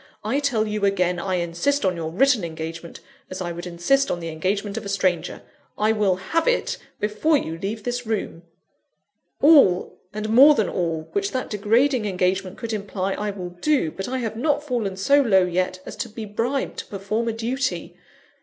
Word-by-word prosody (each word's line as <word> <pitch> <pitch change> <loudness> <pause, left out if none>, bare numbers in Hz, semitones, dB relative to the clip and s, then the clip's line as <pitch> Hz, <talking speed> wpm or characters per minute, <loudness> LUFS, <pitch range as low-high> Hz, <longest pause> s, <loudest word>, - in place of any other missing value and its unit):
I 230 +7 0
tell 250 -7 +1
you 210 -1 -3
again, 180 -3 +1
I 185 +1 -1
insist 175 +11 0
on 185 -1 +2
your 165 -1 -4
written 250 +4 +3
engagement 165 0 -6 0.3
as 185 - -6
I 175 -2 -3
would 175 +1 -6
insist 180 +11 +1
on 175 - -1
the 165 -1 -5
engagement 200 +6 -2
of 225 - -4
a 200 - -6
stranger 185 -4 -1 0.3
I 215 +1 +2
will 210 -4 +2
have 325 - -1
it, - - +1 0.2
before 215 +10 +2
you 165 - -4
leave 205 +3 -4
this 245 0 -2
room!" 220 -7 -3 1.0
"All, 280 - +5
and 215 +1 -4
more 275 +7 +8
than 215 -7 +1
all, 165 -3 -2
which 400 -2 -1
that 255 - -3
degrading 225 +4 +2
engagement 185 -1 -1
could 230 -1 -4
imply, 195 -2 -2
I 210 +1 -3
will 185 -3 -6
do. 180 - +1
But 195 - -5
I 260 - -2
have 225 -3 -3
not 290 +5 0
fallen 230 -9 -2
so 280 +9 +4
low 195 -8 +4
yet, 185 +1 -1
as - - -7
to 235 - -4
be 220 +1 -7
bribed 235 +6 -2
to - - -6
perform 210 +4 -2
a - - +1
duty. 255 +4 -2
210 Hz, 190 wpm, -23 LUFS, 180-245 Hz, 1.0 s, more